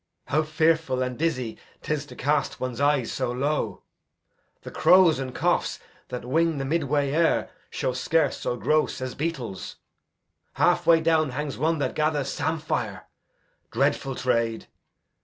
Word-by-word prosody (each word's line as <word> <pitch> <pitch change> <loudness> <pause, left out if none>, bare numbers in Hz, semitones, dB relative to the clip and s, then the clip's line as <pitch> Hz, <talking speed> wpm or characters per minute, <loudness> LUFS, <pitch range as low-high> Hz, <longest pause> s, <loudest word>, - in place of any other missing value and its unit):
How 155 - +3
fearful 155 -4 +1
And 125 0 -3
dizzy 130 -7 -2 0.2
'tis 150 -1 -2
to - - -11
cast 145 +4 0
one's 130 0 -3
eyes 145 -4 +2
so 130 -2 -2
low! 140 +5 -2 0.8
The - - -8
crows 180 -6 +5
and 130 -1 -4
choughs - - +1 0.3
that 125 -1 -6
wing 165 +4 +1
the 135 - -2
midway 145 -2 0
air 165 +3 +2 0.2
Show 130 - -2
scarce 160 +6 +1
so 120 - -2
gross 150 +8 +1
as 130 -1 -4
beetles. 135 - -4 0.8
Halfway 165 -1 +4
down 160 -2 +2
Hangs 140 +1 -4
one 160 +3 +1
that 145 - -1
gathers 150 -3 0
sampire 160 -1 -2 0.6
dreadful 135 -1 0
trade! 115 -3 0
145 Hz, 140 wpm, -25 LUFS, 130-160 Hz, 0.8 s, crows